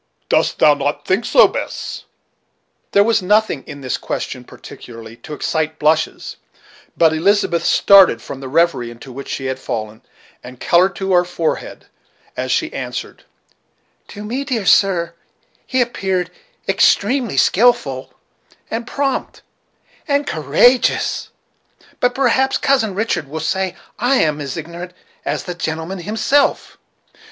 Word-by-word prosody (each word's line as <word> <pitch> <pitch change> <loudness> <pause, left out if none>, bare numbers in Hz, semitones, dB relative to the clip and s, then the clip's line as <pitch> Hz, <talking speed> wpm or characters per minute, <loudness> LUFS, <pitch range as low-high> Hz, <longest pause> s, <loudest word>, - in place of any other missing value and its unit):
Dost - - +2
thou 150 - +6
not 145 0 -3
think 195 +5 0
so, - - +6
Bess?" - - -6 0.9
There 200 - +5
was 225 -1 +2
nothing 210 -6 +1
in 140 -1 -9
this 130 -2 -3
question 125 -2 -5
particularly 115 -2 -12
to 150 - -8
excite 160 +1 -2
blushes, 155 +1 0 0.6
but 160 -1 +4
Elizabeth 170 0 +1
started 195 - +6
from 135 - -8
the 135 - -7
revery 160 -5 +1
into 120 +3 -11
which 135 +2 -8
she 135 - -4
had 130 0 -3
fallen, 110 -3 -5 0.4
and 125 0 -11
colored 185 +3 +3
to 190 -1 -2
her 175 0 +5
forehead 175 -2 -3 0.5
as - - -3
she - - 0
answered: - - -6 0.8
"To 205 - -9
me, 245 +6 -3
dear 245 -7 -2
sir, 170 -2 +3 0.5
he 255 -1 +1
appeared 190 -6 -1 0.4
extremely 235 - +2
skilful, 150 - +2 0.6
and 230 +1 -3
prompt, 275 0 -3 0.6
and 285 -1 +1
courageous; 160 - +2 0.7
but 245 0 +1
perhaps 265 0 +2
Cousin 265 -9 +1
Richard 210 -8 -1
will 155 +3 -5
say 185 +4 -1 0.2
I 245 +4 +2
am 150 - +1
as 140 0 -5
ignorant 170 +3 -7 0.3
as - - -2
the 180 - -5
gentleman 165 +2 -4
himself." 225 +9 0
175 Hz, 135 wpm, -18 LUFS, 150-220 Hz, 0.9 s, thou